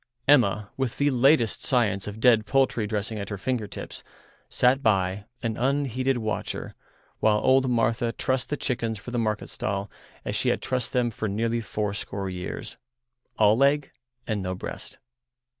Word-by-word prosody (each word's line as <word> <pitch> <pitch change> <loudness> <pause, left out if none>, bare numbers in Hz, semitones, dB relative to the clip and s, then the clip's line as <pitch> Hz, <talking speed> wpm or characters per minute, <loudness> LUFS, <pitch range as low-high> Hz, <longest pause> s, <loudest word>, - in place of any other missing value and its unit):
Emma, 105 -7 +4
with 130 -3 -2
the 145 0 +2
latest 125 -2 +3
science 105 -6 +1
of 105 +1 -6
dead 115 -2 +4
poultry 130 -5 +2
dressing 105 +1 -2
at 100 - -5
her 100 - -4
finger 115 +2 -2
tips, - - -6 0.5
sat 130 +2 +3
by, 100 -3 +1 0.2
an 115 -2 -1
unheeded 135 -1 +1
watcher, 110 -2 -3 0.5
while 110 -1 +4
old 130 +4 +3
Martha 115 0 +1
trussed 130 +1 -1
the 150 - -1
chickens 115 -5 -1
for 110 +5 -9
the 120 - -1
market 110 -2 -1
stall 100 0 -3 0.3
as - - -2
she - - +2
had - - +1
trussed 125 -2 -2
them 120 -2 +1
for 110 +1 -3
nearly 115 +3 0
fourscore 100 -1 -3
years—all 120 +4 -2
leg 140 +2 +2 0.3
and 110 -3 -1
no 95 0 -3
breast. - - -7
115 Hz, 160 wpm, -26 LUFS, 105-125 Hz, 0.5 s, Emma